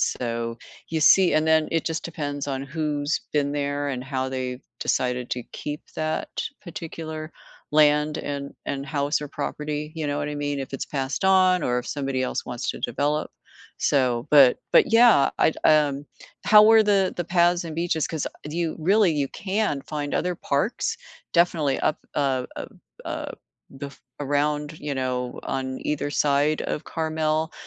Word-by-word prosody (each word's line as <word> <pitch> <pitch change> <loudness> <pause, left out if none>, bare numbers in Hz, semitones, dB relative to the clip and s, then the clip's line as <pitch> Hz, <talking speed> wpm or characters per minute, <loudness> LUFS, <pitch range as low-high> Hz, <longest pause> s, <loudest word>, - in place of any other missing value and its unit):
so 115 -1 -2 0.3
you 160 -1 -1
see 185 +4 +6
and 155 0 +2
then 160 -1 +3
it 165 -1 0
just 160 0 -3
depends 145 -3 -4
on 135 0 -3
who's 150 0 -1
been 145 -1 +1
there, 145 0 -1
and 130 -2 -3
how 130 0 -2
they've 130 -1 -4 0.2
decided 125 -1 -1
to 125 -1 -3
keep 150 0 -5
that 155 0 -2 0.3
particular 160 -2 -7 0.4
land, 150 0 +3
and 140 -1 -4 0.2
and 140 -1 -3
house 140 +1 0
or 150 - -6
property, 150 +1 -4
you 155 -2 -3
know 145 0 -1
what 145 0 -2
I 150 - -4
mean, 145 -1 -2
if 135 -1 -6
it's 135 - -3
passed 135 +5 -3
on 185 -2 +4
or 125 -2 +1
if 125 - -6
somebody 135 -2 -2
else - - -3
wants 120 -1 -5
to - - -8
develop. 145 +5 -1 0.5
So, 125 -3 +1
but 140 -4 +7
but - - +5
yeah, 230 - +6
I'd 160 - +3
um, 145 -2 +3 0.4
how 210 0 +8
were 220 +1 +7
the 200 -3 +2
the 175 - -2
paths 175 0 +2
and 160 -2 -6
beaches, 165 -2 0
'cause, 160 -3 -3
uh 150 - -9
do 155 - -6
you 170 -2 -1
really 195 +3 +4
you 145 -2 0
can 195 -6 -1
find 145 -1 -4
other 180 +1 0
parks 145 - -1 0.4
definitely 165 -5 +2
up 150 - +1 0.2
uh 135 -3 +1
uh - - -5 0.4
uh, - - -4 0.5
bef 140 0 -8 0.2
around, 150 +2 -1
you 145 -1 -4
know, 125 -1 -3
on 130 0 -3
either 150 -1 -2
side 145 +1 +2
of - - -3
Carmel 160 0 -1
150 Hz, 170 wpm, -24 LUFS, 140-160 Hz, 0.5 s, how